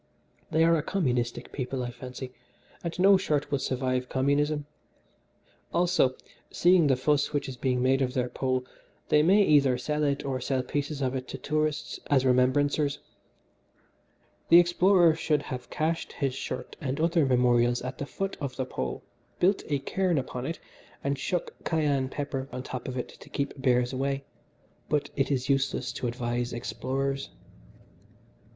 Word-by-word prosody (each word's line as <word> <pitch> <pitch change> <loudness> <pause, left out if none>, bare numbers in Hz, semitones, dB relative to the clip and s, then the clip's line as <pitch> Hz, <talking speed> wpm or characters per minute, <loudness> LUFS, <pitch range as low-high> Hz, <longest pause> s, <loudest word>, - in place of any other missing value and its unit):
They 160 +1 +3
are 165 0 +5
a 155 - +1
communistic 125 -10 -1
people, 130 -1 -3
I 120 - -4
fancy, 125 +1 -8 0.5
and 170 -1 -4
no 195 +2 +6
shirt 150 -7 -1
will 140 - +1
survive 130 -1 -1
communism. 145 +2 +1 1.1
Also, 170 -7 +3 0.3
seeing 175 -3 +4
the 135 - +4
fuss 145 +4 +1
which 145 - -1
is 130 - -6
being 125 0 0
made 135 +1 +3
of 130 0 -1
their 125 -1 +1
Pole, 130 0 -1 0.4
they 150 - +5
may 195 +6 +5
either 140 -7 +4
hide 150 +4 -2
it 140 -1 0
or 130 -2 -2
sell 130 0 0
pieces 145 0 -3
of 130 0 0
it 130 -1 -4
to - - -6
tourists 155 0 -1
as 135 -2 +3
remembrancers. 140 +3 +2 1.5
"The 170 - +9
explorer 175 0 +5
should 150 -2 0
have 125 -3 -6
cached 165 +2 -2
his 135 -3 -1
shirt 125 -1 -5
and 140 -1 -2
other 165 0 +3
memorials 120 -2 +3
at 130 +1 -6
the 140 - -4
foot 195 +5 -3
of 135 -3 -3
the 130 - -2
Pole, - - -4 0.4
built 190 +3 +3
a 145 - +1
cairn 180 +5 0
upon 130 -1 -3
it, 165 - -3 0.5
and 140 0 0
shook 170 +6 -2
cayenne 145 -5 +1
pepper 135 -1 -4
on 125 0 -5
top 125 -2 -6
of 130 0 -4
all 125 - 0
to - - -15
keep 140 -1 -3
bears 125 -1 +2
away 135 +1 -1 0.7
but 150 -1 0
it 135 - +1
is 130 -2 0
useless 135 -1 0
to 125 - -3
advise 120 0 -2
explorers." 135 +3 -3
135 Hz, 165 wpm, -28 LUFS, 130-150 Hz, 1.5 s, The